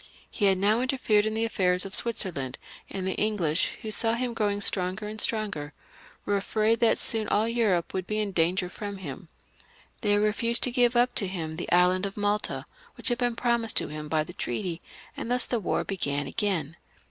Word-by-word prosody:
He 210 - 0
had 195 -1 +4
now 210 +5 +2
interfered 230 -5 +1
in 220 - -2
the 225 +1 +1
affairs 180 -4 +1
of 195 - -8
Switzerland, 185 - 0 0.3
and 190 -1 -4
the 190 - -1
EngUsh, 185 -7 0
who 220 - -4
saw 225 +1 +3
him 245 0 -2
growing 205 -2 0
stronger 190 +1 +1
and 215 +1 -5
stronger, 200 -10 -1 0.5
were 205 0 +1
ajfraid 220 +2 +1
that 230 - +3
soon 220 -2 -1
aU 210 +2 +2
Europe 220 -7 0
would 185 -1 -3
be 215 - -2
in 210 -2 -1
danger 180 +1 +1
from 200 +2 -7
him. 170 0 -8 0.7
They 205 -2 +3
refused 220 +3 +2
to 250 - +4
give 245 -1 +3
up 245 +1 +3
to 200 - +2
him 165 -4 -5
the 175 - -5
island 180 +2 +3
of 195 - -10
Malta, 205 0 0 0.3
which - - -1
had 240 0 -1
been 245 -2 0
promised 235 -2 +2
to - - +4
him 150 0 -6
by 155 0 +1
the - - -10
treaty, 170 - -3 0.3
and - - -5
thus 250 +1 +3
the 240 - -1
war 200 - -1
began 145 -7 -2
again. 165 -1 -1
205 Hz, 200 wpm, -27 LUFS, 180-225 Hz, 0.7 s, had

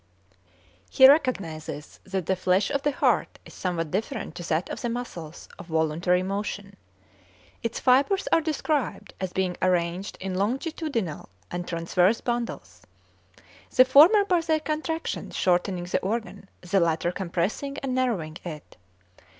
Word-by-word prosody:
He 265 - +8
recognizes 195 - 0
that 190 -2 -3
the 190 - +1
flesh 185 +5 +1
of 280 -1 0
the 290 - +1
heart - - +1
is - - -13
somewhat 165 -4 -3
different 215 - -3
to 175 0 -7
that 160 +2 0
of - - -5
the 240 - -1
muscles 180 -10 -6
of - - -9
voluntary 165 +3 +1
motion. 200 +1 -4 0.9
Its 230 -1 -3
fibres 275 +10 +3
are 330 - +5
described 305 -3 -2
as 185 -2 -2
being 185 -2 -1
arranged 180 +1 0
in 190 0 -4
longitudinal 235 - -2 0.2
and 175 0 -4
transverse 175 +5 +2
bundles; 240 -1 -4 0.9
the 255 - +8
former 330 - +7
by 360 -3 +2
their 320 -1 +1
contractions 315 +1 -3
shortening 180 0 +1
the 175 - -1
organ, 215 -1 -4
the 185 +2 +1
latter 170 0 +1
compressing 190 +10 -2
and 265 -2 -1
narrowing 210 -12 -1
it. 155 -4 -9
195 Hz, 140 wpm, -26 LUFS, 175-265 Hz, 0.9 s, He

